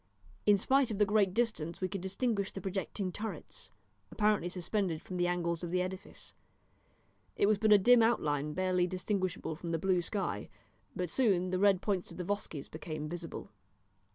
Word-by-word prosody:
In 205 -1 +7
spite 265 +5 +3
of 215 - -3
the 210 - +4
great 205 -2 +3
distance 185 -7 -1
we 185 - 0
could 195 0 -5
distinguish 200 +1 -1
the - - -6
projecting 190 0 -3
turrets, 220 +4 -6 0.4
apparently 210 -4 +1
suspended 180 -1 -1
from 185 - -7
the 175 0 +2
angles 170 -1 -1
of 175 - -3
the 180 +1 +1
edifice. 190 +2 -8 1.0
It - - +3
was 210 0 +3
but 215 0 +3
a 210 - +10
dim 240 +4 +6
outline 150 -10 +1
barely 185 0 +1
distinguishable 185 -2 -2
from 170 +1 -7
the 165 - 0
blue 185 +1 +2
sky, 175 - -3 0.5
but 180 -2 -2
soon 190 -8 +2
the 185 - 0
red 195 -2 +4
points 195 -4 -1
of 170 - -11
the 180 - -3
Vosges 180 -6 -3
became 155 -1 -6
visible. 165 -5 -7
185 Hz, 180 wpm, -32 LUFS, 175-205 Hz, 1.0 s, a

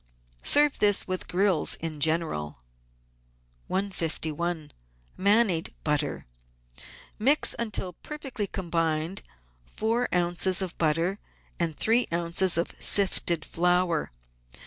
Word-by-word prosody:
Serve 295 -1 +4
this 205 -1 +3
v 185 - -4
ith 185 - -4
grills 185 -3 +2
in 160 -2 -6
general. 155 - -1 1.1
151— 170 -4 -3 0.4
MANIED 200 -4 +2
BUTTER 150 -2 -1 0.9
Mix, 275 +7 +4
until 210 -5 -2
perfectly 270 - -6
combined, 165 -1 -2 0.5
four 230 - -1
oz. 175 +1 +1
of 185 -3 -3
butter 165 +5 +1 0.4
and 165 -3 -1
three 235 +3 +3
oz. 170 +1 +1
of 170 - -1
sifted 175 -5 +3
flour. 175 -1 0
175 Hz, 100 wpm, -27 LUFS, 165-200 Hz, 1.1 s, Serve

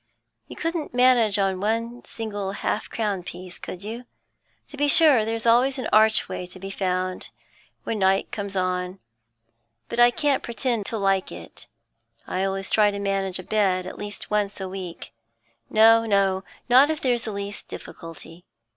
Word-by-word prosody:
'You - - -9
couldn't 330 -5 -3
manage 245 -5 +4
one 220 +5 -1
single 205 -4 -4
half 210 - -2
crown 205 -4 -2
piece, 180 0 -7
could 185 +1 -8
you? 230 +4 -6 0.6
To - - -10
be 290 +1 +1
sure 285 -5 +6
there's 225 +1 -3
always 250 +4 +4
an 255 - -3
archway 215 -4 +3
to 180 - -12
be 195 +1 -7
found, 185 -1 -2 0.5
when 220 - -3
night 190 0 +2
comes 200 -2 -5
on, 185 0 -1 0.9
but 235 - -3
I 240 0 +8
can't 280 +2 +1
pretend 235 -3 -2
to 225 - -1
like 195 -2 +1
it. - - -10 0.6
I 185 - -2
always 195 0 -3
try 210 -1 +5
to 200 - -4
manage 195 -2 0
a 185 - -6
bed 190 -3 +1
at 185 - -8
least 205 +1 -7
once 205 -1 0
a 190 - -4
week 185 -2 -7 0.6
no, 225 +1 +5
no, 195 -2 +2 0.2
not 260 +4 +6
if 315 -1 -1
there's 245 -3 +1
the 220 - -3
least 200 0 -6
difficulty. 165 0 -10
205 Hz, 165 wpm, -24 LUFS, 190-230 Hz, 0.9 s, I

